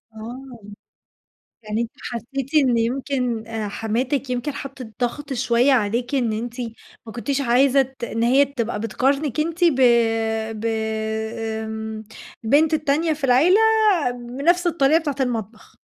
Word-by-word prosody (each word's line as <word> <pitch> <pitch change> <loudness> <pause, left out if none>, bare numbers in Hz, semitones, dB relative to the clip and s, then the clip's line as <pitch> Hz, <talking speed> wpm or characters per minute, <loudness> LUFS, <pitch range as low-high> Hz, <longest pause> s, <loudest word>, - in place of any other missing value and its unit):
آه. 240 +3 -9 1.0
يعني 215 +1 -2
أنتِ 235 - -3
حسّيتِ 260 +4 -5
إن 250 -3 +2
يمكن 245 -1 -1
أ 225 -2 -3
حماتِك 240 +6 -2
يمكن 250 +4 -2
حطِّت 265 -4 -8
ضغْط 275 +4 -2
شوية 245 +1 +2
عليكِ 240 +3 0
إن 240 -5 +1
أنتِ 235 +3 -5 0.5
ما 225 - -8
كنتيش 270 +5 -2
عايزة 265 +2 +4
ت 265 -1 -7
إن 230 0 -2
هي 265 +4 +5
تبقى 235 -6 -3
بتقارنِك 270 +5 0
أنتِ 335 +3 -1
ب 335 -5 +5 0.8
ب 225 - -5 1.0
آمم 220 0 -5 0.4
البنت 295 +7 +3
التانية 310 +1 +1
في 300 -1 -11
العيلة 280 - +5 0.8
بنفْس 350 +4 +3
الطريقة 315 -2 +3
بتاعة 295 -4 -3
المطبخ. 225 -3 -4
255 Hz, 130 wpm, -22 LUFS, 230-280 Hz, 1.0 s, هي